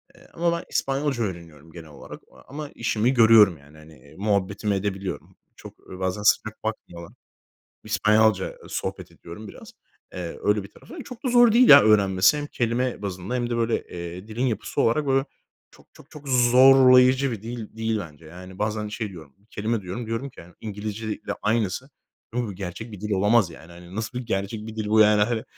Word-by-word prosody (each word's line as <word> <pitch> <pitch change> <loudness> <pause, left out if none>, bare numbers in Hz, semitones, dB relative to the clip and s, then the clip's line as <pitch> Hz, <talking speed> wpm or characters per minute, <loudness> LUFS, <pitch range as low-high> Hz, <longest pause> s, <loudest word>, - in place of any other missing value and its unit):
Eee, - - -19
ama 170 0 0
ben - - -7
İspanyolca 135 -3 -1
öğreniyorum, 80 -5 -8
genel 80 -2 -12
olarak 70 - -12 0.3
ama 145 +2 -7
işimi 115 +2 0
görüyorum, 110 -6 +6
yani, 70 +2 -19
hani, 75 -3 -17
muhabbetimi 100 0 -1
edebiliyorum. 95 -1 -5 0.2
Çok - - -13 0.2
bazen 95 +2 -2
sıcak 110 +1 +1
bakmıyorlar. 85 -6 -6 0.7
İspanyolca 105 -2 +2
sohbet - - -5
ediyorum 100 +6 -11
biraz. - - -13 0.4
Eee, 90 -2 -6
öyle 105 -1 +1
bir 100 - -12
tarafı. 320 -3 -12
Çok 250 +2 -11
da - - 0
zor 240 -2 +5
değil, 245 +2 +5
ya, - - +10
öğrenmesi. 100 +2 +4
Hem 145 - -4
kelime 120 -3 -2
bazında 95 +3 -5
hem 120 -1 -2
de, 120 - -1
eee, - - -2
böyle, 115 0 0 0.4
dilin 120 +4 -2
yapısı 110 -4 -3
olarak, 140 +6 +1
böyle, 135 0 +2 0.5
çok, - - -21
çok, 140 - -18
çok 150 -2 -11
zorlayıcı 130 +1 +5
bir 105 - -7
dil 115 -1 -8
değil 110 -1 -1
bence. 80 -4 -10
Yani, 90 +3 -12
bazen 105 0 -2
şey 105 +1 -4
diyorum, 80 -7 -13 0.2
kelime 110 0 -2
diyorum 100 +6 -6
diyorum 115 +5 -4
ki, - - -14 0.2
İngilizce 105 +1 -6
ile - - -5
aynısı. 110 +5 -1 0.6
Gerçek 100 +5 -7
bir 100 - -10
dil 105 +1 -5
olamaz, 105 0 +3
yani. 85 +3 -13
Nasıl 115 +3 -4
bir 125 - -7
gerçek 105 +1 -3
bir 110 0 -9
dil 110 - -3
bu, 110 +1 +4
yani, 105 -1 +5
hani? 110 +1 -1
110 Hz, 175 wpm, -24 LUFS, 95-120 Hz, 0.7 s, ya